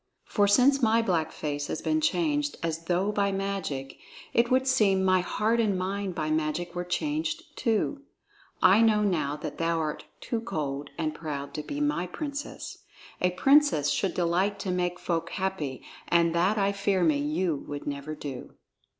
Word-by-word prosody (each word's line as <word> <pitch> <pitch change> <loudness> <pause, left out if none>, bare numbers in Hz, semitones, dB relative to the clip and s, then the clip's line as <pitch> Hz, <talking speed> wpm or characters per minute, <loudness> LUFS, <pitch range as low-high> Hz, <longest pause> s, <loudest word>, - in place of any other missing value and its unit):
For 205 -2 +2
since 260 +7 +5
my 225 0 +4
black 170 -7 0
face 145 -1 -3
has - - -3
been 315 0 +1
changed 295 -2 0
as 165 0 -2
though 185 +4 +1
by 200 -1 +1
magic, 195 -9 -3 0.3
it 235 0 +3
would 260 +1 +3
seem 210 -8 +3
my 185 0 +4
heart 220 +5 0
and 210 -4 +2
mind 190 0 -2
by 155 -3 -1
magic 160 +3 -1
were 175 0 -3
changed 310 - -2
too. 235 +4 0 0.6
I 190 +4 +7
know 215 -2 +4
now 160 -8 0
that 150 - -7
thou 165 0 +1
art 155 -2 -3
too 230 -2 -3
cold 145 -9 -3
and 155 -2 -1
proud 145 -3 -5
to 150 - -3
be 290 - -5
my 295 -12 0
princess; 285 - -6 0.4
a 180 - +4
princess 270 - +4
should 190 +4 0
delight 185 +4 +1
to 190 - -2
make 180 -1 -1
folk 165 -1 -2
happy, 185 -9 -3 0.2
and 170 -1 +3
that 185 +5 +2
I 200 -1 +2
fear 200 -2 +1
me 155 -4 +3
you 155 +2 0
would 145 0 -6
never 145 +2 -4
do." 140 -4 -7
185 Hz, 175 wpm, -28 LUFS, 160-220 Hz, 0.6 s, I